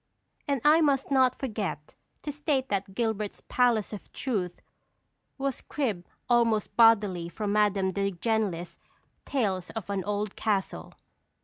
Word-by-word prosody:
And 280 -3 0
I 310 +2 +6
must 280 -3 +2
not 260 -2 +4
forget 205 - -4 0.3
to 295 - -3
state 285 -2 -1
that 195 -1 -2
Gilbert's 220 -3 -2
Palace 235 -4 +2
of 210 - -9
Truth 195 -9 -2 0.8
was 275 -2 -2
cribbed 215 -12 -3 0.2
almost 230 -4 +2
bodily 205 -7 +4
from 205 +2 -3
Madame 205 -2 +2
de 200 +1 0
Genlis's 190 -2 -2 0.5
"Tales 195 -9 -1
of 215 -3 -5
an 195 -2 -1
Old 205 0 -2
Castle." 200 -3 -2
215 Hz, 130 wpm, -28 LUFS, 195-255 Hz, 0.8 s, I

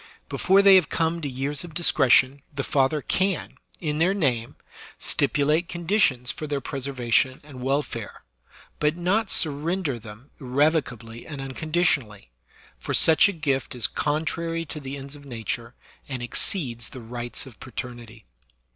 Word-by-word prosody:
Before 195 +1 +4
they 200 -1 +8
have 180 - +2
come 165 +1 0
to 145 - -3
years 135 +3 -2
of 165 -3 -11
discretion, 135 -4 +4
the 140 -1 -3
father 140 +2 +1
can, 190 0 0 0.2
in 150 -2 -2
their 180 +4 +3
name, 125 - 0 0.4
stipu 145 -1 +2
late 160 +4 +2
conditions 170 - +1
for 155 - -6
their 145 -1 -1
preservation 130 -2 0
and 140 -4 -11
welfare, 130 -5 -2 0.6
but 150 +2 +1
not 195 +5 +1
surrender 155 -2 +1
them 110 +5 -13
irrevocably 125 -4 0
and 145 -3 -7
unconditionally; 135 - -1 0.5
for - - -2
such 160 +5 +5
a - - 0
gift 140 -8 -1
is 120 - -1
contrary 165 +2 -1
to 150 - -7
the 140 0 -6
ends 140 +1 -8
of 145 - -13
nature, 120 -2 -5 0.3
and 130 -3 -4
exceeds 120 - +1
the 130 - -9
rights 120 +3 -4
of 130 -5 -14
paternity. 120 -3 -8
140 Hz, 145 wpm, -25 LUFS, 125-160 Hz, 0.6 s, they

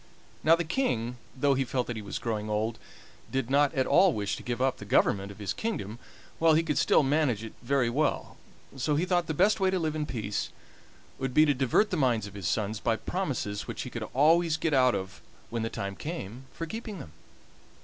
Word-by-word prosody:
Now 165 +1 +6
the 175 - -1
King, 125 - -1 0.2
though 140 +1 +3
he 135 0 +1
felt 125 0 -1
that 120 - -4
he 110 - -5
was 100 -2 -5
growing 110 -2 -3
old, 110 +2 -1 0.5
did 135 -1 -1
not 145 0 +4
at 130 -1 +2
all 185 0 +5
wish 105 -1 -2
to - - -9
give 120 0 -3
up 130 0 +1
the - - -9
government 100 0 +2
of 100 - -12
his 105 -2 -3
kingdom 120 - -4 0.4
while 160 -1 +5
he 160 - +3
could 155 -3 0
still - - +4
manage 135 -6 +1
it 115 - -8
very 130 0 +1
well, 145 +6 -1 0.4
so 145 +3 0
he 165 +5 +1
thought 175 -2 +1
the 160 - -2
best 205 +7 +3
way 190 -1 +3
to 190 - +1
live 160 -3 -1
in 150 -1 -2
peace 105 -4 -3 0.7
would 130 -2 -3
be 155 - +7
to 145 - +3
divert 135 - +2
the 180 - 0
minds 120 -7 +2
of 100 - -10
his 100 -4 -4
sons 105 +1 -1
by 115 0 +1
promises 125 - -3
which - - -4
he - - -7
could - - -5
always 160 +3 +4
get 160 -1 -1
out 130 -2 +4
of 95 +1 -6 0.3
when 115 -1 -2
the 115 - -1
time 100 -2 -4
came 130 - -6
for 165 - -5
keeping 220 +3 -6
them. 85 - -9
130 Hz, 225 wpm, -28 LUFS, 110-160 Hz, 0.7 s, be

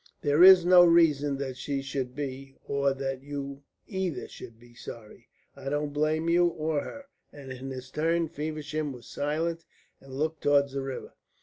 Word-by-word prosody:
"There 145 +1 +3
is 185 -2 +9
no 180 0 +8
reason 150 -5 +4
that 135 -2 -5
she 135 +1 -3
should 135 -2 -4
be, 135 -1 -6
or 140 0 +1
that 135 -1 -4
you 140 0 -6 0.2
either 190 -6 -3
should 115 - -11
be 120 0 -18
sorry. 115 -2 -11 0.3
I 135 - -6
don't 145 0 -2
blame 155 +2 0
you, 175 +1 +4
or 155 -3 -1
her," 280 -1 -9 0.3
and 140 -2 -10
in 130 +1 -7
his 130 0 -8
turn 165 +3 +1
Feversham 155 -1 -4
was 125 -1 -12
silent 165 +3 -2 0.4
and 135 -1 -12
looked 155 +1 -2
towards 140 -1 +3
the 140 - -2
river. 135 -1 -6
145 Hz, 175 wpm, -28 LUFS, 135-160 Hz, 0.4 s, is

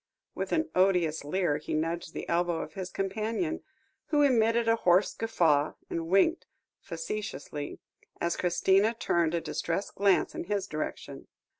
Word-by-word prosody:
with - - -4
an 320 0 +1
odious 180 -5 +2
leer 150 0 0
he 150 - -4
nudged 165 +1 -2
the - - -5
elbow 170 -1 +1
of 155 - -7
his 185 0 -5
companion, 220 - -2 0.5
who 295 -1 +3
emitted 230 -3 +3
a 230 0 +4
hoarse 180 0 +3
guffaw, 160 -10 +2 0.2
and 165 -1 -2
winked 195 - +3 0.3
facetiously, 165 -5 -5 0.4
as 170 0 0
Christina 190 +5 +2
turned 170 -6 +1
a 170 - 0
distressed 170 +5 -3
glance 195 -4 +2
in - - -5
his 200 0 -1
direction. 155 -5 -5
185 Hz, 145 wpm, -29 LUFS, 165-215 Hz, 0.5 s, a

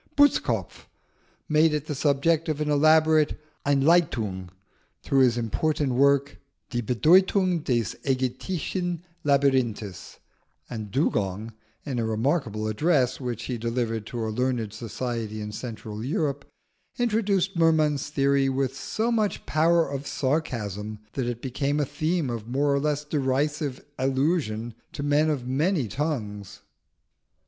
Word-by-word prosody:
Butzkopf 290 0 +2 0.6
made 155 0 +4
it 150 -1 -3
the 150 - -3
subject 150 +3 +1
of 155 -1 -1
an 150 -1 0
elaborate 155 +1 +4 0.3
Einleitung 135 - +2 0.5
to 135 - 0
his 125 -3 +4
important 140 +5 0
work, 140 +2 +2 0.3
Die 120 -1 -1
Bedeutung 180 - +3
des 120 - 0
Aegyptischen 160 +7 -2 0.2
Labyrinthes; 130 - 0 0.5
and 110 -3 -6
Dugong, 105 - -1 0.3
in 130 -5 -2
a - - 0
remarkable 110 -2 0
address 130 +3 +1
which 120 -3 -4
he 125 -3 -4
delivered 115 -2 -2
to 115 -2 -3
a - - -2
learned 120 -2 -1
society 115 -1 -4
in 105 0 -5
Central 110 -1 -6
Europe, 140 0 -1 0.5
introduced 210 -6 +1
Merman's 155 -4 +2
theory 140 -1 +2
with 135 0 -1
so 220 +10 -2
much 215 -3 0
power 165 +2 +3
of 140 0 -5
sarcasm 115 - -2 0.2
that 130 -3 -2
it 120 -1 -4
became 140 +3 -1
a 145 - +2
theme 155 0 -1
of 115 -2 -5
more 140 +3 +1
or 140 - +2
less 150 0 -1
derisive 145 -1 -1
allusion 130 -4 0 0.2
to 145 - -4
men 145 +2 +3
of 135 -5 -2
many 145 - +1
tongues. 105 - -4
140 Hz, 130 wpm, -26 LUFS, 120-155 Hz, 0.6 s, made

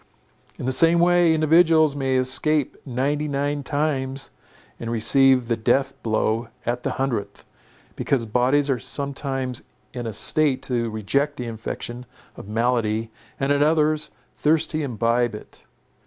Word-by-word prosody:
In - - -6
the 130 - 0
same 165 +6 +5
way, 175 0 +4
individuals 160 -1 +4
may 135 -2 -1
escape 135 +3 +1
ninety 140 +4 -1
nine 145 0 -2
times, 135 -2 -2 0.5
and 115 - -5
receive 125 +2 +4
the 115 - +1
death 135 +4 +1
blow 110 +1 0 0.2
at 120 +1 -2
the - - -2
hundredth; 115 -7 -3 0.5
because 130 -5 -1
bodies 125 +6 +2
are 135 -3 0
sometimes 135 -3 -3 0.3
in 120 -2 -5
a 110 - -4
state 145 +4 +1
to 120 -2 -1
reject 140 +8 -1
the 125 - -4
infection 120 +2 -6 0.3
of - - -11
malady, 115 -1 0 0.3
and 135 +1 0
at 145 0 +2
others, 155 0 +2 0.3
thirsty 155 +1 +1
to 150 - -2
imbibe 120 -1 0
it. - - -13
135 Hz, 140 wpm, -23 LUFS, 120-145 Hz, 0.5 s, same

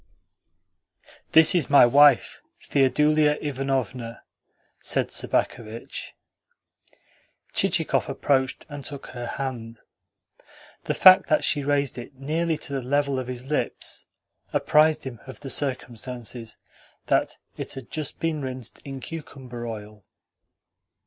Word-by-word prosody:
"This 160 0 +8
is 175 -6 +1
my 140 -3 +8
wife, 140 +1 +5 0.3
Theodulia 150 +2 +3
Ivanovna," 130 -4 -3 0.6
said - - +1
Sobakevitch. 115 -1 -2 1.4
Chichikov - - +1
approached 130 -2 0
and 145 -2 -8
took 140 0 -7
her 120 -1 -6
hand. 120 -4 -5 1.1
The - - -1
fact 185 0 +8
that 155 - +3
she 145 -1 +1
raised 140 -3 0
it 120 +3 -10
nearly 160 +4 -1
to 145 - -5
the 135 - -1
level 140 +1 0
of 130 - -5
his 130 +2 -7
lips 150 - -2 0.4
apprised 155 0 +3
him 125 -4 -7
of 130 - -10
the 135 -2 -5
circumstance 125 -3 -3 0.7
that - - +1 0.2
it - - -5
had 135 -3 -9
just 150 -2 -4
been 165 -2 -1
rinsed 130 -3 -6
in 135 -1 -7
cucumber 130 -6 -7
oil. 105 -2 -8
135 Hz, 115 wpm, -25 LUFS, 125-145 Hz, 1.4 s, This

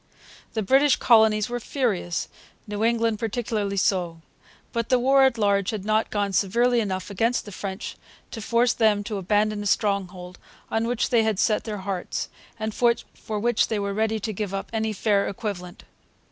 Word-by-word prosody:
The 220 - -1
British 270 +6 +4
colonies 220 -3 +4
were 245 0 -3
furious, 215 - -1 0.4
New 210 0 -3
England 230 -2 +1
particularly 215 -3 -2
so. 175 -4 0 0.5
But 230 -1 -2
the 255 - +5
war 270 +2 +5
at 260 -3 +2
large 200 -2 +2
had 210 -3 -4
not 215 +1 +1
gone 205 -2 -1
severely 235 +6 +2
enough 190 -2 -3
against 230 +5 0
the 205 - -9
French 190 0 -6 0.3
to 225 - -6
force 235 +2 +2
them 215 -3 +2
to 205 -1 -4
abandon 210 +2 +1
a 205 - -3
stronghold 190 -4 -1 0.3
on 225 +1 0
which 245 -1 -1
they 235 -2 +5
had 220 -2 0
set 215 +2 +1
their 215 -2 -4
hearts, 190 -3 -3 0.3
and 220 0 -3
for 235 -2 -1
which 235 0 +2
they 220 - -1
were 200 -1 -2
ready 220 +1 0
to 215 +1 -3
give 200 -1 -3
up 195 - -5
any 220 -1 0
fair 205 -1 +1
equivalent. 185 -4 -6
215 Hz, 175 wpm, -24 LUFS, 200-230 Hz, 0.5 s, the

